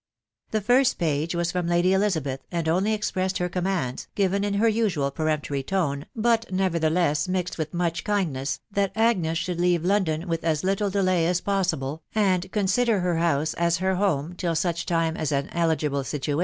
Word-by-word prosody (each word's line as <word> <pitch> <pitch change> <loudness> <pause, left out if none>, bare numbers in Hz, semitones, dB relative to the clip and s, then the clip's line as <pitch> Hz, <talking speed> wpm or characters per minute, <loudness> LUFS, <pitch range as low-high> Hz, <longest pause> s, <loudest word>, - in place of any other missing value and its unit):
The 215 - -1
fir6t 245 +5 +3
page 160 +1 -1
was 170 0 0
from 180 -2 -2
Lady 175 +2 +3
Elizabeth, 160 -10 0
and 170 -2 -2
only 185 +6 +2
expressed 190 -3 -1
her 180 - 0
commands, 180 -8 -2
given 200 0 +1
in 205 -1 -1
her 220 +3 +3
usual 200 -11 +1
peremptory 150 -2 -1
tone, 145 -3 -1
but 230 -1 +1
never 185 -2 +1
theless 155 -2 +1
mixed 180 -2 -2
with 155 -1 -2
much 175 -1 -1
kindness, 150 -10 -1
that 200 -1 0
Agnes 200 -8 +2
should 175 0 -2
leave 175 -2 +2
London 180 -4 +1
with 165 -1 -2
as 160 -1 0
little 195 +2 +1
delay 185 -4 +2
as 180 0 +1
possible, 165 -7 -1
and 190 -3 +1
consider 210 +1 +2
her 175 -2 0
house 155 -2 +1
as 170 0 +1
her 190 +2 0
home 180 -5 0
till 175 -2 -2
such 170 0 -1
time 165 -1 +1
as 155 -2 -2
an 140 0 -1
eiigvbte 165 -2 0
«v\m^\a. 145 +1 -2
175 Hz, 185 wpm, -25 LUFS, 160-195 Hz, -, fir6t